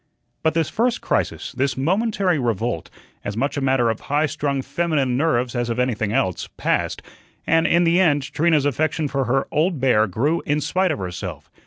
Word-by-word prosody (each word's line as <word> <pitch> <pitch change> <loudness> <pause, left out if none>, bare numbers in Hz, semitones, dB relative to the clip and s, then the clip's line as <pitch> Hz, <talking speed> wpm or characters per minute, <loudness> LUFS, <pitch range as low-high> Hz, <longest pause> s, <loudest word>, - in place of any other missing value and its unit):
But 160 0 +1
this 165 -2 +2
first 240 +2 0
crisis, - - -2
this 130 -1 -1
momentary 190 - +1
revolt, 115 - -2 0.3
as 100 +1 -4
much 140 +4 -1
a 140 - -2
matter 130 -3 +2
of 110 - -5
high 145 +2 0
strung 140 -2 -2
feminine 150 -7 0
nerves 125 -4 +1
as 120 -1 -1
of 115 - -2
anything 115 -4 0
else, 95 -4 -1
passed, - - -1 0.4
and 165 +1 +3
in 170 +1 +3
the 170 +1 +3
end 145 -6 +3
Trina's 155 -3 +2
affection 150 +2 0
for 135 -1 -1
her 135 +3 0
"old 160 +1 +1
bear" 125 -4 +3
grew 140 - 0
in 145 +1 0
spite 185 +5 0
of 155 - -1
herself. 90 -5 -6
140 Hz, 185 wpm, -22 LUFS, 120-160 Hz, 0.4 s, and